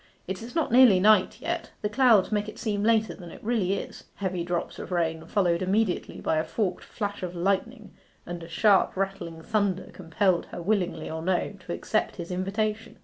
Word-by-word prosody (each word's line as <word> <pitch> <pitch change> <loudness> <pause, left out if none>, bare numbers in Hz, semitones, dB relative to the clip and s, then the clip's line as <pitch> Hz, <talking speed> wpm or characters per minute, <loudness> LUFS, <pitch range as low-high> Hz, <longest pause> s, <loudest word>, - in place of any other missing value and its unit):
It 190 +2 -5
is 235 +5 -9
not 325 -7 +1
nearly 240 -6 +7
night 210 -1 +4
yet. - - -3
The - - +2
clouds 220 -3 +4
make 210 0 0
it - - -11
seem 210 -3 -2
later 220 0 +2
than 175 -3 -11
it - - -12
really 215 -5 +1
is.' 200 - -6
Heavy 185 -3 -2
drops 175 0 -3
of - - -7
rain, 165 -2 -1
followed 175 -4 +1
immediately 195 +1 0
by 160 - 0
a 155 - +2
forked 205 -1 -2
flash 205 -2 -4
of 180 -1 -5
lightning 200 +5 -1 0.3
and 175 -1 -6
sharp 195 +3 +3
rattling 190 -4 -3
thunder 200 -3 -1
compelled 180 +1 0
her, - - -8
willingly 175 -4 -1
or 160 0 -4
no, 185 +3 0
to - - -4
accept 215 - -1
his 170 -2 -7
invitation. 210 +4 -2
195 Hz, 190 wpm, -27 LUFS, 175-215 Hz, 0.3 s, nearly